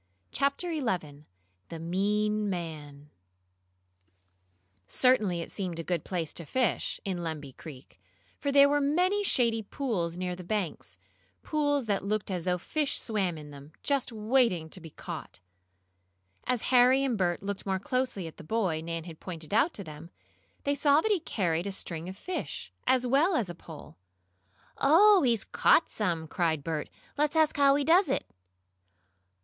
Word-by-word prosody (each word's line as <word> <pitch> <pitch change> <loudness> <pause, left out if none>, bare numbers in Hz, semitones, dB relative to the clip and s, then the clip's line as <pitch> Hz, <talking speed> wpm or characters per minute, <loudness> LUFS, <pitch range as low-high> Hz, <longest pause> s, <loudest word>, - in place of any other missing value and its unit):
CHAPTER 280 +5 0
XI 175 - -3 0.4
THE 165 - -6
MEAN 205 +5 0
MAN 150 -5 -6 1.8
Certainly 215 -9 +2
it - - -7
seemed 185 -4 -4
a 165 - -3
good 170 -2 -2
place 170 -5 -3
to 170 - -6
fish, 255 - 0
in 190 -3 -2
Lemby 155 -4 -5
Creek, 140 -5 -12 0.4
for 280 - -1
there 280 0 +7
were 290 +1 +2
many 360 +8 +2
shady 235 - +2
pools 195 -8 -2
near 180 0 -2
the 180 - -9
banks 175 - -3 0.5
pools 290 -3 0
that 200 -3 0
looked 205 0 -2
as 180 -3 -3
though 180 -1 +1
fish 295 - -1
swam 195 -7 -1
in 150 -1 -10
them, 145 +2 -12
just 280 -3 +1
waiting 215 -7 +1
to 185 - -6
be 165 - -9
caught. 145 - -8 1.1
As 250 -3 0
Harry 255 +2 +6
and 260 -4 0
Bert 175 -3 0
looked 200 0 -4
more 190 -1 +1
closely 255 - -2
at 160 - -9
the - - -10
boy 180 -3 0
Nan 165 0 -4
had 165 -2 -10
pointed 165 -2 -6
out 275 +10 +4
to 200 - -3
them, 155 0 -10 0.5
they 285 - +1
saw 285 +1 +4
that 440 - 0
he 400 - +3
carried 180 - -1
a - - -2
string 170 -3 -5
of 190 - -8
fish, 365 - -5
as 255 -1 +3
well 290 +9 +3
as 240 - +1
the 175 - -6
pole. 160 -2 -12 0.8
"Oh, 380 +7 +6
he's 235 -5 +2
caught 325 - +3
some!" 170 -6 -1
cried 160 -3 0
Bert. 155 -1 -3 0.3
"Let's 300 +1 +2
ask 315 -1 +3
how 280 -1 +5
he 285 - +1
does 340 +2 +4
it." 270 - 0
200 Hz, 165 wpm, -29 LUFS, 170-275 Hz, 1.8 s, there